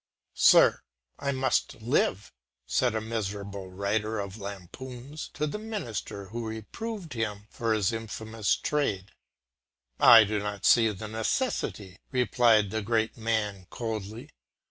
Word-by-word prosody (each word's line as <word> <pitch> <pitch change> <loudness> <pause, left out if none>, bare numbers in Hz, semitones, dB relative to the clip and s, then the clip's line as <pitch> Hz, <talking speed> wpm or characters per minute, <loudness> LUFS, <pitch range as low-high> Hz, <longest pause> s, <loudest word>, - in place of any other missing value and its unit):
"Sir, - - +6 0.4
I 140 - -1
must 130 -1 0
live," 110 -4 0 0.3
said 120 - +1
a 110 - 0
miserable 100 -3 -4
writer 105 +3 -1
of 100 -1 -5
lampoons 120 - -8
to 150 - 0
the 155 +8 -4
minister 120 - -5
who 115 +1 -4
reproved 170 - -6
him 105 -3 -3
for 115 -1 -2
his 110 0 +2
infamous 110 -1 -2
trade. 105 -10 -1 0.9
"I 115 -2 +10
do 105 0 -1
not 105 -1 -4
see 115 -2 +6
the 105 +1 -6
necessity," 110 - -2
replied 115 -4 +3
the 110 - -1
great 110 +1 0
man 110 -5 -2
coldly. 110 -1 -5
110 Hz, 125 wpm, -28 LUFS, 100-120 Hz, 0.9 s, I